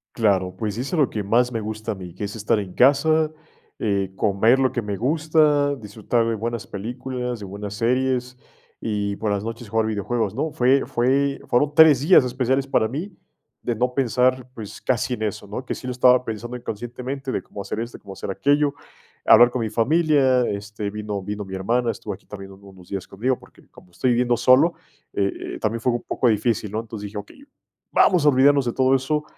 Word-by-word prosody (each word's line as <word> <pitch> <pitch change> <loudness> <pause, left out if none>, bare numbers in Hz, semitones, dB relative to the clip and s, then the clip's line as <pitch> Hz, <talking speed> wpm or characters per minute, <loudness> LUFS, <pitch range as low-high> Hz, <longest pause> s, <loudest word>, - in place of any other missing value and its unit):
Claro, 95 -5 +1
pues, 105 -1 -3
hice 140 +8 -3
lo 145 -5 +3
que 105 - -3
más 120 +5 +2
me 115 - -2
gusta 110 +1 -4
a - - -10
mí, 90 -3 -9
que 100 +3 -5
es 100 - -7
estar 110 0 +1
en 95 -3 -6
casa, 155 +5 +3 0.5
eh, 100 -3 -1
comer 110 +6 +3
lo 130 -1 +2
que 120 - -1
me 105 -2 -4
gusta, 150 - +2
disfrutar 110 +1 -1
de 115 - 0
buenas 115 +1 -4
películas, 125 +3 -5
de 100 - -7
buenas 100 +1 -7
series, 125 +2 0 0.5
y 100 -2 -2
por 105 0 -2
las 100 +1 -2
noches 115 -1 -6
jugar 110 +1 +1
videojuegos, 110 0 -2
¿no? 160 - -2
Fue 135 -1 +3
fue 135 +3 +1
fueron 145 +4 +2
3, 155 -4 +7
días 155 -3 +6
especiales 130 +2 0
para 110 -5 +1
mí, 170 - -5 0.5
de 120 - -1
no 125 +3 0
pensar, 125 0 +1
pues, 110 -5 -9
casi 130 0 0
en 110 -3 -4
eso, 105 -1 -4
¿no? 110 +6 -6
Que - - -3
sí 130 - -8
lo - - -2
estaba 125 0 +4
pensando 120 +3 -5
inconscientemente, 125 +4 -5
de - - -2
cómo 100 - -9
hacer 100 +2 -5
esto, 120 +1 -5
de - - -25
cómo 100 - -11
hacer 95 - -5
aquello, 145 +6 +2 0.5
hablar 120 - +8
con 125 0 -3
mi 110 - -1
familia. 135 +2 +3
Este, 105 0 -4
vino 105 -1 -4
vino 105 +1 -5
mi 95 0 -7
hermana, 115 +6 0
estuvo 105 -2 -4
aquí - - -14
también 100 -1 -9
uno, 95 +1 -16
unos 95 -2 -16
días 95 -2 -5
conmigo, 125 +6 -1
porque, - - -20
como 90 - -18
estoy 90 +9 0
viviendo 120 0 +2
solo, 135 +8 +5 0.4
eh 100 -1 +1 0.2
eh, - - -8
también, 110 +2 -1
fue 120 +2 +1
u - - 0
un 120 - -4
poco 125 - 0
difícil, 110 -1 +1
¿no? 110 +3 -3
Entonces 110 -2 -8
dije: 105 +1 -7
"Okey, 105 - -10 0.5
vamos 180 -6 +4
a - - +7
olvidarnos 140 0 +4
de 120 - -1
todo 130 0 +3
eso 150 +3 0
120 Hz, 210 wpm, -23 LUFS, 105-130 Hz, 0.5 s, hablar